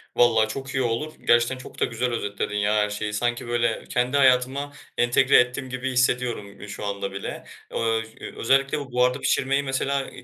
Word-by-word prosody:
Valla 115 -2 +4
çok 135 +5 -6
iyi 130 - +1
olur. 120 +7 -2
Gerçekten 120 +2 +4
çok 130 - -11
da - - +3
güzel 120 +2 -2
özetledin 100 -3 -3
ya 105 +1 +1
her 105 0 +2
şeyi. 105 0 -4
Sanki, 120 +3 -1
böyle, 120 -1 0
kendi 125 +3 +1
hayatıma 135 +2 +3 0.2
entegre 125 +3 +4
ettim 125 +2 0
gibi 130 +1 -3
hissediyorum, 125 -5 0
eee, 100 - -8
şu 105 - -6
anda 100 -1 -3
bile. 100 0 -6 0.3
Ööö, 115 -1 0
ş - - -15
eee, - - -8
özellikle 135 +4 +2
bu 140 -3 -8
buharda 125 +2 +2
pişirmeyi 140 +1 +1
mesela, 135 0 -1
eee, - - -12
125 Hz, 195 wpm, -24 LUFS, 110-130 Hz, 0.3 s, Valla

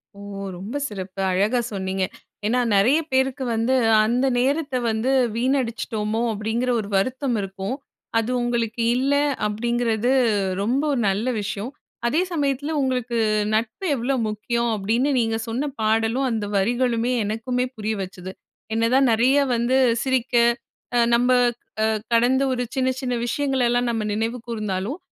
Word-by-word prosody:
ஓ! - - -13 0.4
ரொம்ப 200 +9 -7
சிறப்பு! 195 -1 -6
அழகா 205 +7 +2
சொன்னீங்க. 190 0 -2 0.4
ஏன்னா, 245 +4 +2 0.2
நெறைய 245 +11 +4
பேருக்கு 265 +1 +1
வந்து, 230 +4 +1 0.3
அந்த 245 +4 +1
நேரத்தை 280 +1 0
வந்து 220 +4 0 0.2
வீணடிச்சிட்டோமோ? 230 -4 -1
அப்படீங்கிற 225 +4 -2
ஒரு 205 - -4
வருத்தம் 255 +3 0
இருக்கும். 195 +4 -4 0.4
அது 225 +1 -2
உங்களுக்கு 235 -1 -1 0.2
இல்ல, 275 +2 +1 0.3
அப்படீங்கிறது 235 +2 0 0.5
ரொம்ப 245 +7 +1
ஒரு 255 - 0
நல்ல 210 +6 0
விஷயம். 205 +4 -4 0.4
அதே 310 +9 +2
சமயத்தில 285 -2 -1
உங்களுக்கு 250 -3 -1 0.4
நட்பு 220 - -1
எவ்வளோ 255 +3 -1
முக்கியம்? 235 +3 -1
அப்படீன்னு 225 +7 0
நீங்க 225 -1 0
சொன்ன 260 +6 -2
பாடலும், 225 +4 +1
அந்த 220 -2 -1
வரிகளுமே, 240 +3 +1
எனக்குமே 235 +4 -1
புரிய 215 +1 -2
வச்சுது. 185 0 -7 0.4
என்ன 225 +1 +2
தான் 270 0 +5
நெறைய 250 +5 +3 0.2
வந்து 240 +2 +1 0.3
சிரிக்க 260 -2 0 0.6
அ - - +4
நம்ப 245 +2 +3 0.5
அ - - +4 0.3
கடந்த 245 +3 +3
ஒரு 250 -1 -1
சின்ன 260 -1 +1
சின்ன 255 -2 -2
விஷயங்களெல்லாம் 245 -2 +1
நம்ம 225 -2 -1
நினைவு 225 +3 -1
கூர்ந்தாலும் 215 - -3
235 Hz, 135 wpm, -23 LUFS, 215-255 Hz, 0.6 s, தான்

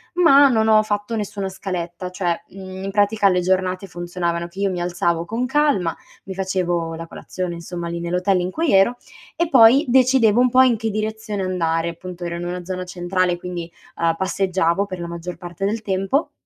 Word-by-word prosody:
ma 285 -6 +6
non 220 -3 +2
ho 215 -1 +6
fatto 205 +1 -2
nessuna 205 -2 -3
scaletta, 180 -2 -5
cioè, 180 -2 -2
mhmm, 190 0 -9
in 195 - -3
pratica 205 0 +3
le 180 -1 +2
giornate 185 +1 0
funzionavano 175 -1 -3
che 175 +3 -12
io 200 -1 +1
mi 180 -1 -3
alzavo 175 -1 0
con 230 +7 -2
calma, 265 - +1 0.3
mi 190 - -6
facevo 175 -3 -1
la 165 +1 -7
colazione 180 +1 -5
insomma 170 0 -6
lì 170 0 -4
nell'hotel 180 +2 +1
in 180 +1 -3
cui 325 - 0
ero, 195 +6 +4 0.4
e 340 +1 +1
poi 260 0 +7
decidevo 250 -3 +4
un 250 - +4
po' 255 +1 +5
in 250 -2 +4
che 225 +1 -2
direzione 215 -1 -3
andare, 170 -2 0
appunto, 175 +1 -8
ero 170 0 -3
in 175 - -5
una 175 0 -5
zona 185 0 -4
centrale 180 0 -1
quindi, 175 -1 -6 0.3
uhm, 165 -1 +1
passeggiavo 190 -1 0
per 185 -2 -7
la 170 - -5
maggior 170 0 -6
parte 175 +1 -5
del 215 +2 -1
tempo; 195 - 0
185 Hz, 195 wpm, -21 LUFS, 175-215 Hz, 0.4 s, poi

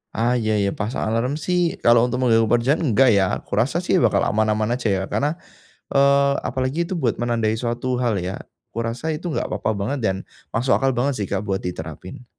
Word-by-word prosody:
Ah, 120 +2 +1
iya 110 -2 0
iya, 100 -1 +1
pasang 110 +3 -2
alarm 115 +4 0
sih, 180 -1 +1 0.2
kalau 120 0 +6
untuk 125 0 -1
mengganggu 115 -3 +4
pekerjaan, 125 +7 +2
enggak 130 -2 +4
ya. 100 - +4 0.2
Aku - - -6
rasa 130 +10 +1
sih - - +2
bakal 105 - +3
aman-aman 110 +2 +1
aja 120 -3 -3
ya, 95 - 0
karena, 150 +5 -1 0.5
eee, 140 0 +4 0.2
apalagi 130 +3 -2
itu 190 - -3
buat 125 -9 0
menandai 115 -2 0
suatu 120 +1 -2
hal 120 -4 +1
ya. 95 - -4 0.3
Kurasa 115 +8 -3
itu 155 +3 -4
gak - - -1
apa-apa 105 +1 -1
banget 105 +8 -2
dan 95 -5 0 0.3
masuk 125 +3 0
akal 135 - +2
banget 135 +4 +1
sih, 100 - -1
Kak, 100 +1 -1
buat 95 -1 -1
diterapin. 90 - -7
120 Hz, 200 wpm, -22 LUFS, 110-135 Hz, 0.5 s, kalau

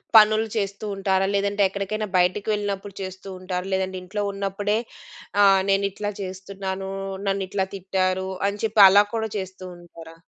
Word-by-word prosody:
పనులు 215 +1 +7
చేస్తూ 200 0 -3
ఉంటారా? 195 0 +1
లేదంటే 200 +1 0
ఎక్కడికైనా 200 +2 -3
బయటికి 180 +4 +1
వెళ్ళినప్పుడు 200 -1 -3
చేస్తూ 190 +1 -7
ఉంటారా? 185 0 -4
లేదంటే 190 0 -1
ఇంట్లో 205 +3 -3
ఉన్నప్పుడే 200 +1 -1 0.7
ఆహ్, 195 -1 +6
నేనిట్లా 200 +1 0
చేస్తున్నాను, 190 0 -5 0.4
నన్నిట్లా 195 0 -1
తిట్టారు 190 0 -1 0.2
అని 200 +1 -3
చెప్పి 215 -1 +4
అలా 205 +2 +7
కూడా 220 0 -1
చేస్తూ 190 0 -8
ఉంటారా? 165 -1 -13
195 Hz, 135 wpm, -24 LUFS, 190-205 Hz, 0.7 s, పనులు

